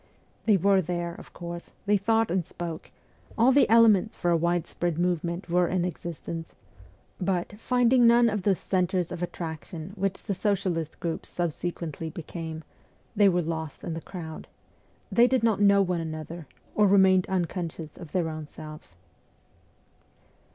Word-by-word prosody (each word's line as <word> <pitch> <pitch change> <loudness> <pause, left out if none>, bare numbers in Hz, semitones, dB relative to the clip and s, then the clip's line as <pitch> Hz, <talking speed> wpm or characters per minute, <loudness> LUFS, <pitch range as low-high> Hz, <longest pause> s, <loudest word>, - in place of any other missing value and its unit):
They 210 -3 +6
were 195 +1 +4
there, 175 0 -3
of - - -12
course; 170 0 -8
they 205 0 +3
thought 225 +1 +2
and 180 0 +1
spoke; 165 0 -7 0.5
all 235 +4 +5
the 280 +2 +4
elements 220 -2 +5
for 175 - 0
a - - +4
widespread 170 0 0
movement 175 0 -1
were 175 0 +2
in 180 -1 0
existence; 170 -1 -6 0.6
but, 180 0 -1
finding 245 0 +4
none 235 0 +6
of 210 -3 0
those 190 -1 +2
centres 180 -2 0
of 180 -1 -5
attraction 165 0 -6
which 195 -1 -2
the 205 - -2
socialist 185 -5 -1
groups 165 -1 -3
subsequently 170 -1 -3
became, 160 0 -7 0.5
they 205 -1 +6
were 175 -1 +1
lost 160 -1 -5
in 170 - -3
the 165 - -5
crowd; 160 -4 -8 0.6
they 240 +1 +6
did 255 -2 +1
not 220 -3 +2
know 200 -1 +6
one 180 -2 -1
another, 160 0 -6 0.3
or 210 -1 +4
remained 190 -2 +5
unconscious 170 -4 -3
of 165 -4 -11
their 175 -3 0
own 155 -1 -6
selves. 155 - -11
175 Hz, 150 wpm, -27 LUFS, 165-200 Hz, 0.6 s, They